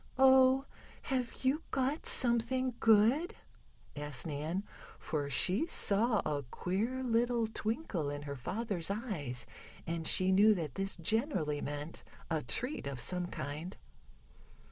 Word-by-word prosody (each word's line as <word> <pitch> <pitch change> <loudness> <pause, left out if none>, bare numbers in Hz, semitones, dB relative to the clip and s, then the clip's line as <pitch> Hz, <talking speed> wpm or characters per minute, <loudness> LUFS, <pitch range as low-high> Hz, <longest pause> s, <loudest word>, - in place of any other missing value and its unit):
"Oh, 265 0 +6 0.4
have 255 -2 -3
you 280 +5 +2
got 270 +4 -1
something 250 +1 +3
good?" 230 - +4 0.6
asked 145 -4 -2
Nan, 160 +5 -3 0.3
for 145 -2 -3
she 190 - +1
saw 215 -2 +2
a 145 -2 -1
queer 205 - -3
little 235 -1 +1
twinkle 220 - -3
in 145 0 -5
her 140 -1 -5
father's 195 - -3
eyes, 175 - -4 0.4
and 165 -1 -2
she 185 0 +4
knew 210 +3 +6
that 155 -7 -4
this 195 0 -3
generally 170 - 0
meant 145 +2 -5 0.3
a 160 -2 +1
treat 250 - -2
of 135 -2 -5
some 180 +7 +1
kind. 155 +5 -6
200 Hz, 125 wpm, -33 LUFS, 150-245 Hz, 0.6 s, Oh